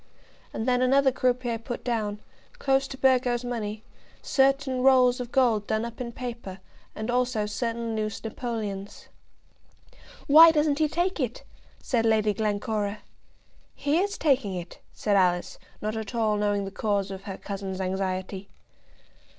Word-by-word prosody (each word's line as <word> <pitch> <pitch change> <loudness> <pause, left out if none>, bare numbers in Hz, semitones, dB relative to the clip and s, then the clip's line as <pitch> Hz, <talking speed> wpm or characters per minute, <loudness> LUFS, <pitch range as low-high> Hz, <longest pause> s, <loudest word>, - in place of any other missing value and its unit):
And 220 - -4
then 250 0 +2
another 265 +1 +4
croupier 250 -2 0
put 235 +1 -6
down, 210 -4 -2 0.4
close 270 - +1
to 270 - -8
Burgo's 250 -2 +2
money, 220 -3 -4 0.4
certain 270 -1 +2
rolls 255 -1 +5
of 245 -1 -5
gold 230 -6 +2
done 220 +1 0
up 235 +1 -7
in 235 -1 -4
paper, 235 -6 -7 0.4
and 220 +2 -3
also 245 -3 +1
certain 230 +1 -3
loose 215 0 -3
napoleons. 215 -4 -5 1.2
"Why 320 +3 +9
doesn't 300 -2 +2
he 310 - +3
take 345 +4 -1
it?" 250 -4 -3 0.4
said 230 -3 +1
Lady 215 -1 +3
Glencora. 210 0 -2 0.7
"He 290 +4 +1
is 405 +2 -1
taking 265 -10 +1
it," 175 -1 -7
said 205 -1 0
Alice, 180 -2 +1 0.2
not 215 +1 -2
at 220 +1 -5
all 220 -2 +2
knowing 205 -1 0
the 195 - -6
cause 200 -1 -1
of 195 0 -8
her 195 -2 -6
cousin's 195 -2 -5
anxiety. 190 +1 -3
230 Hz, 145 wpm, -26 LUFS, 205-255 Hz, 1.2 s, Why